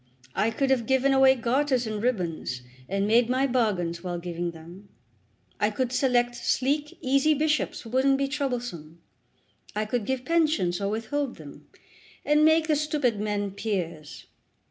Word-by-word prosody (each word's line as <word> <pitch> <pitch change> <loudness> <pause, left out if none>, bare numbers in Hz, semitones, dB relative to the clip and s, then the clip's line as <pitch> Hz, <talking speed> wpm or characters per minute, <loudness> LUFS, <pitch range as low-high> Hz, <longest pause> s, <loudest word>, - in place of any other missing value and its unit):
I 220 - +1
could 270 +3 0
have 245 -4 +1
given 265 +1 +3
away 265 0 +6
garters 255 +1 +1
and 215 -1 -3
ribbons, 170 - -2 0.3
and 195 +1 0
made 230 +3 +3
my 260 +2 +2
bargains 190 -10 0
while 175 -1 -3
giving 175 0 -4
them. 170 +5 -12 0.7
I 210 - +2
could 245 +3 -2
select 245 -2 +2
sleek, 290 +5 -1
easy 275 +4 +3
bishops 305 +1 0
who 225 - -11
wouldn't 270 +2 +3
be 275 0 0
troublesome. 245 - -4 0.8
I 215 +1 0
could 220 0 -2
give 260 -1 -2
pensions 305 - +1
or 200 - 0
withhold 240 +6 -2
them, 145 -3 -13 0.6
and 300 +1 +4
make 315 +1 +5
the 310 - +3
stupid 290 -7 0
men 205 -1 -2
peers. 175 -7 -4
240 Hz, 155 wpm, -26 LUFS, 195-275 Hz, 0.8 s, away